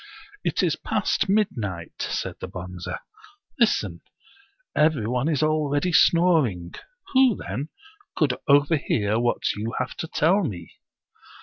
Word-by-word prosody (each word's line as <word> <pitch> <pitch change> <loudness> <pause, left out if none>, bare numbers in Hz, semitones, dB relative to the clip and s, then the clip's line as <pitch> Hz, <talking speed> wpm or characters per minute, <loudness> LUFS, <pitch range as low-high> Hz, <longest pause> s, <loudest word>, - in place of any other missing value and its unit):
" - - -23
It - - 0
is - - +2
past 200 - -1
midnight," 115 - -1
said - - -3
the - - -4
Bonze. 90 -1 -8 0.4
" 405 -1 -30
Listen! - - +1 0.7
every 150 -8 +3
one 125 +6 0
is 150 -2 +1
already 155 +2 +1
snoring. 155 - +3 0.4
Who, 260 -4 +5
then, 145 +5 -5 0.5
could 145 -5 +2
overhear 140 -7 +2
what 120 0 0
you 110 +3 -4
have 130 - -2
to 160 - -4
tell 180 +7 +2
me 90 - -5
145 Hz, 130 wpm, -24 LUFS, 105-165 Hz, 0.7 s, Who